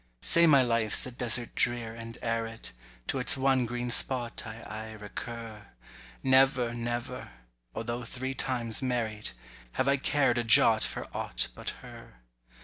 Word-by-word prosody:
Say 170 Hz, 0 st, +7 dB
my 140 Hz, -4 st, +6 dB
life's 115 Hz, -3 st, +1 dB
a 125 Hz, -, -7 dB
desert 120 Hz, -1 st, -1 dB
drear 120 Hz, -2 st, 0 dB
and 115 Hz, 0 st, -9 dB
arid, 115 Hz, -, -3 dB, 0.3 s
To -, -, -2 dB
its -, -, +4 dB
one 130 Hz, -2 st, +2 dB
green 120 Hz, +1 st, -3 dB
spot 120 Hz, -1 st, +2 dB
I 110 Hz, +2 st, -9 dB
aye 110 Hz, 0 st, -7 dB
recur: 110 Hz, 0 st, -8 dB, 0.6 s
Never, 130 Hz, -2 st, +3 dB
never—although 115 Hz, -, -6 dB
three 130 Hz, +3 st, -5 dB
times 120 Hz, -3 st, -1 dB
married— 115 Hz, -5 st, -2 dB, 0.4 s
Have 130 Hz, -, 0 dB
I 140 Hz, 0 st, +3 dB
cared 135 Hz, -3 st, +1 dB
a -, -, 0 dB
jot 110 Hz, -1 st, +6 dB
for -, -, -3 dB
aught -, -, -2 dB
but -, -, -6 dB
her. -, -, -12 dB
120 Hz, 145 wpm, -29 LUFS, 110-125 Hz, 0.6 s, Say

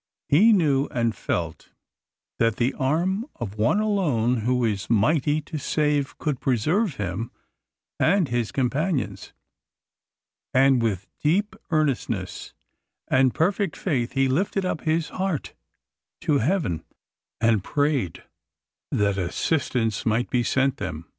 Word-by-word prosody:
He 200 Hz, +11 st, +6 dB
knew 150 Hz, -9 st, +3 dB
and 115 Hz, -2 st, 0 dB
felt -, -, -3 dB, 0.7 s
that 115 Hz, -2 st, +2 dB
the 125 Hz, +2 st, 0 dB
arm 170 Hz, -, 0 dB
of 115 Hz, -7 st, -5 dB
One 115 Hz, -, +3 dB
alone 150 Hz, -, +1 dB
who 125 Hz, +2 st, +1 dB
is 105 Hz, -3 st, -2 dB
mighty 145 Hz, +7 st, +2 dB
to 155 Hz, +1 st, -6 dB
save 145 Hz, -1 st, 0 dB
could 150 Hz, -5 st, -2 dB
preserve 150 Hz, -, +1 dB
him 105 Hz, +2 st, -3 dB, 0.7 s
and 195 Hz, -5 st, +3 dB
his 120 Hz, -3 st, -1 dB
companions; 140 Hz, +4 st, -1 dB, 1.2 s
and 135 Hz, -1 st, +5 dB
with 100 Hz, -5 st, -1 dB
deep 200 Hz, +8 st, +1 dB
earnestness 125 Hz, -, -1 dB, 0.5 s
and 130 Hz, -1 st, +3 dB
perfect 190 Hz, +1 st, 0 dB
faith 130 Hz, -10 st, -1 dB
he 135 Hz, -1 st, +2 dB
lifted 185 Hz, +7 st, 0 dB
up 175 Hz, -, -2 dB
his 160 Hz, -1 st, 0 dB
heart 185 Hz, -4 st, -3 dB, 0.7 s
to 145 Hz, -2 st, +2 dB
heaven, 130 Hz, -, 0 dB, 0.6 s
and 115 Hz, -4 st, +2 dB
prayed 145 Hz, -, -1 dB, 0.7 s
that 100 Hz, -1 st, +1 dB
assistance 115 Hz, -, -1 dB
might 115 Hz, +2 st, 0 dB
be 125 Hz, -, +2 dB
sent 135 Hz, +3 st, +1 dB
them. 80 Hz, +1 st, -5 dB
135 Hz, 120 wpm, -24 LUFS, 115-160 Hz, 1.2 s, He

